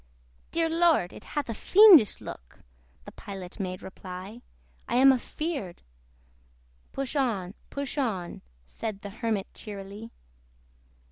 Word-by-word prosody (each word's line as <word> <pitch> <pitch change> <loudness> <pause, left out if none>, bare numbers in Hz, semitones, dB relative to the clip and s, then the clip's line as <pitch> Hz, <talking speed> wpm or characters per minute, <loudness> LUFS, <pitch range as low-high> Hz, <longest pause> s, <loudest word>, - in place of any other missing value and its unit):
"Dear 330 0 +1
Lord! 325 - +3
it - - -11
hath 295 -1 -3
a 230 - -3
fiendish 360 - +7
look - - -10 0.4
(The - - -9
Pilot 195 0 -9
made 185 -2 -4
reply) 190 +4 -9 0.5
I 235 - -1
am 265 +2 +7
a 260 - +2
feared" 280 - -5 1.1
"Push 275 +1 -4
on, 210 -10 0 0.2
push 280 +1 -4
on!" 195 -10 -2 0.2
Said 205 - -6
the 200 - -7
Hermit 220 -2 -3
cheerily. 205 +1 -8
220 Hz, 125 wpm, -28 LUFS, 190-280 Hz, 1.1 s, fiendish